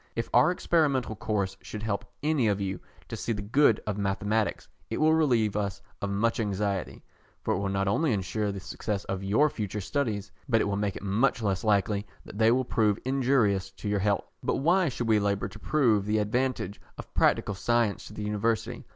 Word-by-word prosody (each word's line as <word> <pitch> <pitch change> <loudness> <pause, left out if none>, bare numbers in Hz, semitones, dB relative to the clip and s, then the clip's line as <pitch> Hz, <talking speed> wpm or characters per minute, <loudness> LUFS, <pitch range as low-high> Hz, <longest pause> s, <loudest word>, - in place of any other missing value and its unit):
If 115 - -3
our 155 - +6
experimental 145 -10 +1
course 105 -2 -1
should 105 0 -7
help 100 -2 -2 0.2
any 150 -6 +2
of 100 -1 +1
you 95 -1 -3 0.3
to - - -5
see 115 - -2
the 105 -2 -4
good 115 +2 +4
of 105 -1 -2
mathematics, 105 +2 -1 0.2
it - - -2
will 155 +1 +4
relieve 120 -10 +2
us 100 -2 -2 0.2
of 100 - -2
much 115 +4 +1
anxiety, 100 -3 -2 0.4
for - - +1
it - - -1
will 100 0 -1
not 95 0 0
only 140 +9 +2
ensure 105 +1 -1
the 100 - -5
success 100 +2 -4
of 95 0 -4
your 105 +10 +3
future 105 -7 -4
studies, 105 -3 -2 0.2
but 115 -2 +4
it - - +2
will 100 0 -1
make 100 -1 -1
it - - -7
much 115 +5 +1
less 100 -1 0
likely 100 -1 +1 0.2
that 105 - -9
they 110 0 +5
will 130 +2 +2
prove 105 -3 +2
injurious 125 -8 +2
to 105 - -7
your 105 0 +1
health. 100 +1 0
But - - 0
why 175 +3 +3
should 120 -2 -3
we 110 -1 +4
labour 100 -1 0
to 105 - -12
prove 110 -8 +2
the 105 +1 +2
advantage 110 -1 -1 0.2
of - - -10
practical 105 - +2
science 115 +1 0
to - - -11
the 105 - -5
University? 105 +2 -1
105 Hz, 205 wpm, -28 LUFS, 100-120 Hz, 0.4 s, our